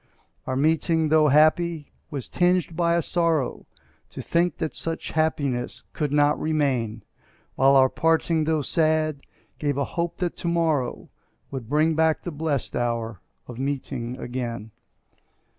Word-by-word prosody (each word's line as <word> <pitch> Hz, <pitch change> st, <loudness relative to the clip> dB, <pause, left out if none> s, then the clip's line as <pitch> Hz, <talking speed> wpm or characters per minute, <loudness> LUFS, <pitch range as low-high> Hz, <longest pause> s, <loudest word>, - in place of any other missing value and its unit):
Our 130 Hz, -, -1 dB
meeting, 160 Hz, +2 st, +2 dB
tho' 155 Hz, 0 st, +5 dB
happy, 155 Hz, +2 st, +3 dB, 0.2 s
was 140 Hz, -4 st, -5 dB
tinged 180 Hz, -2 st, +1 dB
by 170 Hz, 0 st, +2 dB
a 170 Hz, -, +1 dB
sorrow 165 Hz, -5 st, 0 dB, 0.4 s
To -, -, -10 dB
think 170 Hz, +1 st, 0 dB
that 160 Hz, -2 st, -3 dB
such 165 Hz, 0 st, -5 dB
happiness 140 Hz, -6 st, -1 dB
could 150 Hz, -3 st, -2 dB
not 145 Hz, 0 st, +3 dB
remain; 130 Hz, -9 st, 0 dB, 0.5 s
While 135 Hz, +1 st, +4 dB
our 130 Hz, -1 st, +7 dB
parting, 160 Hz, +2 st, +1 dB
tho' 155 Hz, -2 st, +1 dB
sad, 155 Hz, -1 st, +1 dB, 0.4 s
gave 145 Hz, -2 st, -1 dB
a 140 Hz, -, +1 dB
hope 170 Hz, +3 st, -3 dB
that 175 Hz, -2 st, -2 dB
to -, -, -4 dB
morrow 160 Hz, -7 st, 0 dB, 0.4 s
Would 130 Hz, -5 st, -6 dB
bring 155 Hz, +2 st, +3 dB
back 160 Hz, 0 st, +2 dB
the 175 Hz, -, -4 dB
blest 150 Hz, -2 st, -2 dB
hour 115 Hz, -4 st, -2 dB, 0.3 s
of 120 Hz, -1 st, -9 dB
meeting 130 Hz, -3 st, -3 dB
again. 120 Hz, -4 st, -5 dB
150 Hz, 140 wpm, -24 LUFS, 130-165 Hz, 0.5 s, our